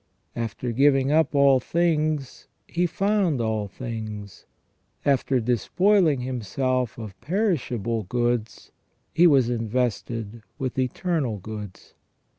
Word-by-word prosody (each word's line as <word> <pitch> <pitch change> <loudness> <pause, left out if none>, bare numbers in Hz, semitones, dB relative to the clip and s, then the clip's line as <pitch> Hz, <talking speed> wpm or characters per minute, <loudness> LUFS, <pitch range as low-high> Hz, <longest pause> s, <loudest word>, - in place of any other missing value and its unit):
After 115 +1 -3
giving 135 +2 +3
up 155 -1 +2
all 140 -2 +5
things, 155 -2 -1 0.2
he 175 +1 0
found 195 -4 +1
all 110 -2 -1
things; 110 -2 -7 0.6
after 135 -1 +2
despoiling 155 - +2
himself 125 0 -2
of 105 -5 -9
perishable 130 - -1
goods, 120 +1 -2 0.4
he 175 +2 +6
was 135 -6 +4
invested 115 -1 -2 0.2
with 130 -2 -3
eternal 130 - -1
goods. 105 -1 -9
125 Hz, 100 wpm, -25 LUFS, 115-150 Hz, 0.6 s, he